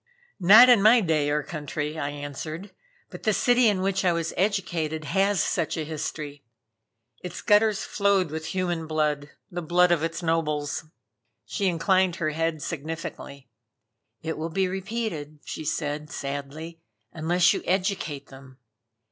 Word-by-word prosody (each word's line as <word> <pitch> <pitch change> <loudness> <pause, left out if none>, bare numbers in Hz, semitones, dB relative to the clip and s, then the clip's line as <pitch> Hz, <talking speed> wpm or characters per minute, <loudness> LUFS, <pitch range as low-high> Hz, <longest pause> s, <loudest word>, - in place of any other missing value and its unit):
"Not 210 +7 +9
in 245 -5 +6
my 220 +4 +7
day 155 -7 +1
or 150 0 0
country," 155 -2 -4
I 140 - -2
answered 145 +6 -6 0.4
"But - - -9
the 215 - +2
city 245 +4 +4
in 200 -3 +2
which 195 0 0
I 180 - +4
was 165 -1 -2
educated 170 -6 -1
has 195 +3 +2
such 170 -2 -1
a 155 - -2
history. 150 -2 -5 0.8
Its 180 -1 -7
gutters 210 0 +3
flowed 200 -5 +1
with 160 0 -5
human 175 -4 -2
blood, 150 -2 -1 0.2
the 175 0 -4
blood 175 +2 +3
of 170 -3 +3
its 165 +1 -3
nobles." 155 -2 -1 0.6
She 195 - -1
inclined 185 +1 +2
her 155 -4 -1
head 165 -1 -2
significantly. 155 -3 -6 0.8
"It 160 -1 -3
will 160 +1 -3
be 190 +3 0
repeated," 190 -6 -4
she - - -6
said 150 0 -3
sadly, 145 +3 -6 0.3
"unless 170 +2 +3
you - - -3
educate 185 -6 -1
them. 135 -1 -14
165 Hz, 150 wpm, -26 LUFS, 150-190 Hz, 0.8 s, Not